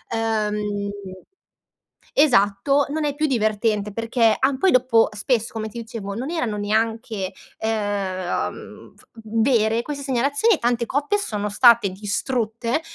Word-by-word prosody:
uhm 210 -2 -1 1.3
esatto, 275 +1 +3
non 310 +1 -2
è 290 - 0
più 310 +1 +1
divertente 215 -4 0
perché 230 +1 +2
ah, 265 +1 +1
poi 380 - +3
dopo 245 -3 +4
spesso 230 +1 0
come 220 -1 -3
ti 235 +2 -7
dicevo 220 -3 -6
non 250 +6 -4
erano 245 -11 -2
neanche, 220 -2 -1 0.3
uhm, 205 -4 -3
v - - -23 0.2
vere 225 -2 +2
queste 285 0 -6
segnalazioni 280 - +2
e - - -3
tante 240 0 0
coppe 290 +8 0
sono 210 - -2
state 235 0 +5
distrutte 225 +5 -2
225 Hz, 130 wpm, -22 LUFS, 210-260 Hz, 1.3 s, state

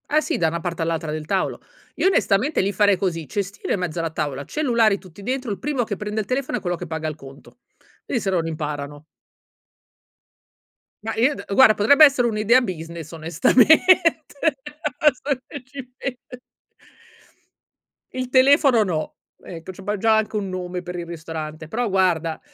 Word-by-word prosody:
Ah, 305 - +4
sì, - - -2
da 165 -2 +2
'na 170 +1 -3
parte 170 0 -4
all'altra 165 -1 -2
del 155 0 -4
tavolo. - - -1 0.3
Io - - +2
onestamente 275 - +2
lì 195 +1 0
farei 200 -2 +3
così: 165 -5 -2
cestino 200 -1 -3
in - - -1
mezzo 175 -2 -3
alla 165 0 -1
tavola, 145 -3 -3
cellulari 235 - +2
tutti 185 0 -15
dentro, 255 0 -3
il 200 - -4
primo 280 -3 -1
che 220 -2 -4
prende 210 +1 -3
il - - -7
telefono 255 +3 -2
è - - -7
quello 175 -1 -1
che 175 +1 -7
paga 160 0 -4
il 155 - -4
conto. 135 - -15 0.5
I 245 - 0
se 200 - -2
non 175 -3 0
imparano. 145 -2 -5 2.0
Ma 225 0 -3
i 255 +6 +3
d - - -8
guarda 225 0 +7
potrebbe 285 +10 +7
essere 265 -4 +3
un'idea 225 +3 +3
business 165 - -6
onestamente, 290 - +3 0.6
adesso 280 -2 +1
che 285 -3 -9
ci 270 +1 -9
pen 270 -2 -4 2.0
Il 255 0 -3
telefono 265 -2 +5
no. 165 -6 -3 0.3
Ecco, 170 +1 -8
c'abbiam 205 +2 -3
già 220 +2 +3
anche 220 0 -1
un 200 -2 -2
nome 180 -1 -4
per 180 0 -6
il 170 - -5
ristorante, 160 -2 -7
però, 240 +4 -1
guarda 175 -4 +1
195 Hz, 170 wpm, -22 LUFS, 165-250 Hz, 2.0 s, guarda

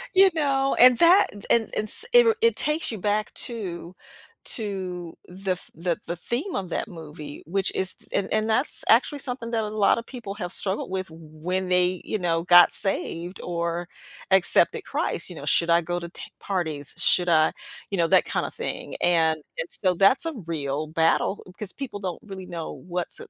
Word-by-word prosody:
You 385 +1 +7
know? 275 -3 +1
And 250 -1 +8
that, 350 +4 +6
th 205 -1 -11
and 230 -1 +4
and - - +1
s 440 - +1
i 485 - +10
ru 455 -1 +4
it 460 0 +4
takes 300 -1 0
you 220 - -5
back 210 +2 0 0.2
to 185 -7 -6 0.5
to 185 -6 -1
the 190 +1 -4
f 180 - -11
the 170 +1 -2
the 170 - -3
theme 245 - -3
of 185 -3 -3
that - - -3
movie, 155 -5 -10
which 195 +2 +1
is 190 0 0
th - - -22
and 195 - 0
and 215 +1 +1
that's 255 +6 0
actually 265 +5 +4
something 245 -3 -5
that 225 -2 0
a 210 - -3
lot 215 +1 +2
of 230 - -9
people 235 -6 -7
have 180 -4 -5
struggled 195 0 -3
with 190 -2 -3
when 165 +4 -5
they, 180 0 +2
you 215 - -2
know, 165 -2 0
got 175 -1 +7
saved 180 -2 -2
or 170 0 -3 0.4
accepted 190 -2 +3
Christ, - - -2
you - - -9
know? - - -8
Should 170 0 +2
I 170 +1 +5
go 175 +1 -3
to 170 0 -7
t - - -8 0.2
parties? 160 -8 -3
Should 180 +1 +3
I 155 -1 +4 0.4
You 195 - -1
know, 165 - +3
that - - +4
kinda - - -2
thing, - - -5
and 160 -2 +3 0.2
and, 165 - -3
so 185 -2 +1
that's 200 - +4
a 330 - -2
real 150 -1 -3
battle 165 +5 +1
because 190 +2 -7
people 255 -7 -6
don't 185 0 -4
really 190 -3 -9
know 165 -2 -6
what's 175 0 -3
acc - - -10
185 Hz, 200 wpm, -25 LUFS, 170-220 Hz, 0.5 s, i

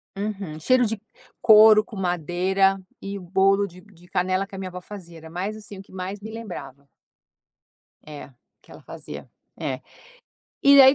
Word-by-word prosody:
Uhum, 195 -6 -4
cheiro 250 +8 +4
de 220 -1 -3 0.4
couro 215 -1 +8
com 215 - -12
madeira 185 +2 +1 0.2
e 200 0 -5
bolo 195 +2 +2
de 180 0 -14
de 205 0 -21
de - - -17
canela 185 +2 0
que 195 - -25
a 190 - -6
minha 190 - -4
vó 180 0 -7
fazia, 180 -3 -10
era 160 0 -11
mais 195 +6 -4
assim 205 -2 -10
o - - -7
que 195 - -19
mais 190 +2 -5
me 220 +2 -8
lembrava. 145 - -8 1.2
É, 145 -2 -9 0.3
que - - -20
ela - - -12
fazia, - - -9 0.3
é. - - -3 0.8
E 280 0 +9
aí 265 +1 +9
195 Hz, 175 wpm, -24 LUFS, 180-210 Hz, 1.2 s, E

